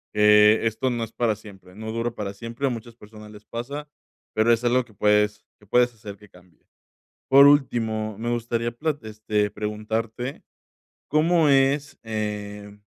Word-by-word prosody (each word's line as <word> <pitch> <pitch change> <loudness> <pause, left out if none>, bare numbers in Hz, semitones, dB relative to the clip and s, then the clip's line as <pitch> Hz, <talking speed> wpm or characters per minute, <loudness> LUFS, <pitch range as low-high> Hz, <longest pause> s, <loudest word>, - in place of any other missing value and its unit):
que 105 +1 +6
esto 120 +4 -1
no 120 -1 -2
es 115 - -7
para 115 -3 0
siempre, 95 -4 -15
no 110 +2 -7
dura 115 +1 -2
para 100 -3 -6
siempre, 115 +5 -4
a - - +1
muchas 120 -1 -7
personas 105 -1 -13
les 105 0 -14
pasa, 140 +6 -6 0.5
pero 115 +2 +4
es 115 - -1
algo 125 0 +2
que 110 - -21
puedes 105 +1 +2 0.2
que 105 - -21
puedes 125 +4 +3
hacer 105 -2 -10
que 105 -1 -18
cambie. 90 -1 -22 0.7
Por 140 +1 +9
último, 110 -7 +2
me 120 +1 -3
gustaría 120 0 -1
plat 145 +4 -3
este 105 -1 -1
preguntarte, 110 +5 -4 0.7
¿cómo 155 +1 +3
es, 140 +1 +2
eh, 105 -1 -5
110 Hz, 160 wpm, -24 LUFS, 105-120 Hz, 0.7 s, Por